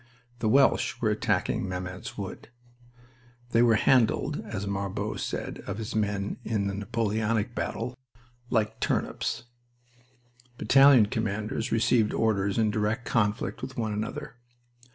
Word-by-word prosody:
The 110 - +1
Welsh 135 +4 +3
were - - +1
attacking - - 0
Mametz 90 0 -6
Wood. 100 +2 -7 1.0
They 115 - +4
were 115 -2 +5
handled, 130 +6 +2
as 100 -2 -4
Marbot 100 -1 -3
said - - -4
of 100 - -3
his 110 -1 -5
men 100 -2 -1
in 105 -3 -1
a - - -6
Napoleonic 110 +2 -1
battle, 120 +1 -3 0.5
"like 110 -2 0
turnips." - - -1 1.1
Battalion 135 -4 +6
commanders 110 +2 -2
received 115 -1 +2
orders 100 -3 +1
in 110 -2 +2
direct 105 +4 -1
conflict 105 0 0
with 130 0 -7
one 110 -3 -1
another. 110 +3 -5
110 Hz, 125 wpm, -27 LUFS, 100-115 Hz, 1.1 s, Battalion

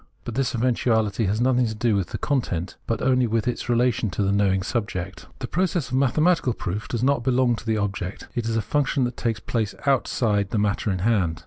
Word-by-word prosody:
But 120 - -5
this 130 0 0
eventuality 115 -3 +1
has 105 +3 0
nothing 125 0 +3
to 110 - -4
do 110 0 +1
with 95 -4 -1
its - - -5
content, 100 - -1
but 115 -2 -1
only 130 -2 +3
with 115 +1 0
its 125 0 -3
relation 120 -2 +2
to 95 +3 -1
the 100 - +1
knowing 95 -2 +2
subject. 95 - -4
The - - -5
process 175 -5 0
of - - -8
mathematical 140 +1 +2
proof 105 +1 -4
does 120 -1 -2
not 140 -2 +2
belong 125 -1 +2
to 115 - -10
the 110 -1 +1
object; 100 -2 -3
it 120 -2 -2
is 115 0 0
a 110 - 0
function 140 +2 +1
that 120 0 -2
takes 115 -3 -1
place 110 -3 -2
outside 110 -7 +1
the - - -1
matter 105 +1 0
in 95 -2 -1
hand. 95 -8 +1
115 Hz, 220 wpm, -24 LUFS, 100-125 Hz, -, nothing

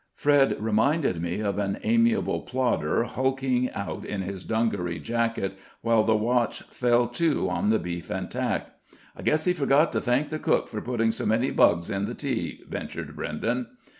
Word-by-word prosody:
Fred 145 -2 +3
reminded 110 - +1
me 85 +4 -2
of 100 -1 -1
an 100 -1 -1
amiable 230 0 +2
plodder 125 -2 0
hulking 130 0 0
out 100 - -4
in 95 -2 -3
his 95 0 -5
dungaree 100 -7 -1
jacket, 115 -4 -1 0.3
while 115 -1 +3
the 110 0 +3
watch 120 +2 +1
fell 120 -1 +2
to 155 +5 +1
on 105 - 0
the 110 - +4
beef 85 -3 -5
and - - -4
tack. - - -2 0.4
"I - - -10
guess 155 +1 +2
he 180 - +3
forgot 150 -1 +3
to - - 0
thank 130 +4 +1
the 155 - -3
cook - - +1
for 105 - -5
putting 115 -2 +1
so 110 - -3
many 115 +4 +2
bugs 85 +4 +3
in 100 0 -1
the - - -5
tea," - - -3
ventured - - -6
Brenden. 115 +12 -2
115 Hz, 175 wpm, -26 LUFS, 105-130 Hz, 0.4 s, the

